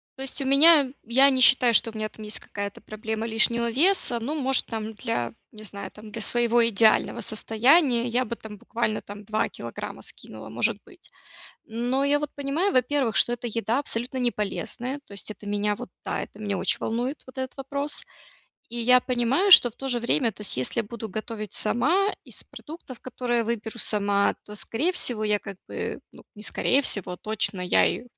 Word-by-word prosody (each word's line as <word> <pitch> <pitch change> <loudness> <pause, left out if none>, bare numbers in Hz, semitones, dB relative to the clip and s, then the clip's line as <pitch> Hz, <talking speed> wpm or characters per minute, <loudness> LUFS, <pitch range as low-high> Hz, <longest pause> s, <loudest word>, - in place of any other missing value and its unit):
То 265 - -5
есть, 270 +1 -5
у - - -2
меня, 280 0 +6
я 265 +5 +5
не 260 - 0
считаю, 245 -1 +6
что 225 - +4
у - - -21
меня, 215 0 -2
там, 215 - -11
есть 210 - +1
какая-то 200 -1 -6
проблема 220 +1 -5
лишнего 235 +1 +2
веса, 300 -3 +3
ну, 285 +7 -3
может, 265 0 +3
там, 220 -1 -5
для, 205 - -3 0.2
не 215 0 -12
знаю, 200 -1 -7
там, 215 0 -13
для 225 0 -6
своего 240 +1 +2
идеального 230 +1 +3
состояния, 240 +5 +3
я 245 +1 +1
бы, 235 - -5
там, 215 -2 -11
буквально, 220 +1 -2
там, 205 +1 -10
2 215 +1 -1
килограмма - - -8
скинула, - - -9
может - - 0
быть. - - -18 0.6
Но, 245 +4 -1
я 285 +1 +3
вот 295 -1 -3
понимаю, 285 +8 -1
во-первых, 255 -1 +1
что 240 - +4
эта 240 0 -4
еда 230 +3 +1
абсолютно 250 -1 -2
не 245 -1 +1
полезная, 245 +6 -4
то - - -13
есть, 200 +1 -5
это 210 - -11
меня, 205 0 0
вот, - - -9 0.2
да, - - -2
это 205 - -10
меня 205 -2 -2
очень - - +1
волнует 245 +6 -3
вот 260 - -14
этот 260 +1 -5
вопрос, 280 +2 -3 0.7
и, - - -3
я 250 +2 +5
понимаю, 250 - +1
что, 245 - +10
в 220 - -23
то 270 - -5
же 245 -2 +1
время, 235 0 +2
то 205 - -17
есть, 200 - -1
если 130 - -1
буду 225 +1 -7
готовить 215 0 -6
сама 320 - +2 0.2
из - - -8
продуктов, 300 -6 -11
которые 240 -2 -2
выберу 225 0 -4
сама, 200 -2 +2
то, 210 - -9
скорее 260 - 0
всего, 240 -11 -1
я, 210 -1 +2
как 200 -2 -9
бы, - - -5
ну, - - -15
не 210 - -11
скорее 255 +5 +1
всего, 195 -9 -3
точно, 215 -2 -1
я 180 - +3
и - - -2
235 Hz, 200 wpm, -25 LUFS, 215-260 Hz, 0.7 s, что